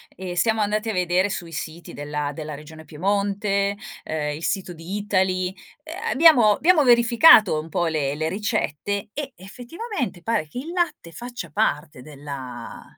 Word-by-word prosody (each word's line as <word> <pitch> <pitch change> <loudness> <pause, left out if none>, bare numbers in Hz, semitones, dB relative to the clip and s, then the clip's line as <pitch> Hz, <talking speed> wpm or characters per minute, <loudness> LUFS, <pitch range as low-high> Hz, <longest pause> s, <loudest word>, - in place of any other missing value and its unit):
e 180 -1 -6
siamo 220 +3 +2
andati 210 +2 0
a 220 - -1
vedere 180 +2 +1
sui 175 -4 -5
siti 160 +3 -7
della 145 0 -3
della 150 -1 -6
regione 160 +2 -12
Piemonte, 200 +4 0 0.3
ehm 150 -1 -3
il 160 - -9
sito 185 -2 -2
di 170 +5 -6
Eataly, 185 -2 0 0.3
eh, 315 - -10 0.2
abbiamo 260 -9 +6
abbiamo 320 - +4
verificato 235 - +6
un 160 +1 -8
po' 175 - 0
le 150 -3 -1
le 155 +1 -2
ricette 200 +1 -2
e 280 -3 -5
effettivamente 245 - -6
pare 225 -9 0
che 200 - -11
il 310 +7 -5
latte 335 - -2
faccia 240 - -8
parte 150 -2 -1
della 135 -4 -8
190 Hz, 155 wpm, -23 LUFS, 155-225 Hz, 0.3 s, abbiamo